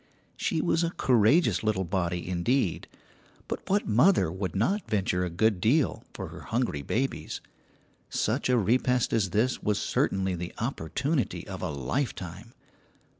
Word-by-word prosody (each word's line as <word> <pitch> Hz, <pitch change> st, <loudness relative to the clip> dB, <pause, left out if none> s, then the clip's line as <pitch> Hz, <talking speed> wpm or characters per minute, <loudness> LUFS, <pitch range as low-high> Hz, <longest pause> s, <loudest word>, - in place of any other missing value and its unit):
She 160 Hz, -, 0 dB
was 170 Hz, 0 st, +1 dB
a 170 Hz, -, +1 dB
courageous 115 Hz, -, +3 dB
little 105 Hz, -3 st, 0 dB
body 90 Hz, -1 st, -2 dB
indeed, 90 Hz, +3 st, 0 dB, 0.6 s
but -, -, -5 dB
what 200 Hz, +2 st, +2 dB
mother 115 Hz, -, +4 dB
would 95 Hz, -1 st, -4 dB
not 190 Hz, -, 0 dB
venture 95 Hz, -4 st, +1 dB
a 90 Hz, -, -1 dB
good 95 Hz, +2 st, +1 dB
deal 135 Hz, -, +2 dB
for -, -, -6 dB
her -, -, -10 dB
hungry 115 Hz, -, -1 dB
babies? 130 Hz, -, -2 dB, 0.7 s
Such 125 Hz, +5 st, 0 dB
a 125 Hz, -, +4 dB
repast 125 Hz, +3 st, +2 dB
as 105 Hz, -5 st, +2 dB
this 110 Hz, +7 st, +1 dB
was 105 Hz, -1 st, 0 dB
certainly 95 Hz, -1 st, 0 dB
the 90 Hz, 0 st, -5 dB
opportunity 125 Hz, -, -2 dB
of -, -, -6 dB
a -, -, -2 dB
lifetime. 90 Hz, -, -4 dB
110 Hz, 145 wpm, -28 LUFS, 90-130 Hz, 0.7 s, mother